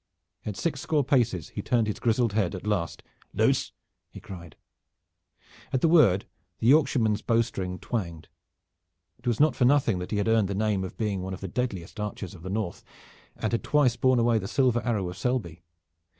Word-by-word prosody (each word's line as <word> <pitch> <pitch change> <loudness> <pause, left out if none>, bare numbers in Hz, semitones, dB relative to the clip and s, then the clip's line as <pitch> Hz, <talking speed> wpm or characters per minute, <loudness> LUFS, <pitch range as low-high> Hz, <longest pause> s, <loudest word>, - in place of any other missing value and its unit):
At 105 -2 -4
six 145 -2 -2
score 150 -3 +1
paces 120 - +1
he - - -5
turned 120 -3 +1
his 105 - -3
grizzled 115 -1 +1
head 100 -3 0
at 95 - -8
last. 100 -6 -2 0.3
"Loose!" - - +2 0.4
he - - -11
cried. 85 -4 -10 1.2
At 130 - 0
the - - +4
word 150 - +5 0.3
the - - -4
Yorkshireman's 125 -6 +3
bow 115 -1 +2
string 95 -5 -5
twanged. 85 -10 -4 0.9
It - - -10
was 120 -2 +1
not 150 -3 +4
for 125 - +2
nothing 125 -7 +3
that 90 - -6
he 105 - -1
had 105 - 0
earned 115 -3 +3
the 100 - -3
name 105 -2 0
of 95 - -7
being 105 -4 -1
one 95 +1 -4
of - - -12
the 95 - -4
deadliest 100 -4 -4
archers 105 -3 -5
of 85 - -12
the 95 - -7
North 100 -3 -3 0.5
and 110 - -2
had 115 - -1
twice 145 -5 +3
borne 130 0 +3
away 115 -1 +3
the 95 - -5
silver 125 0 +2
arrow 105 -6 -1
of 90 0 -7
Selby. 105 -10 -2
110 Hz, 195 wpm, -27 LUFS, 95-125 Hz, 1.2 s, word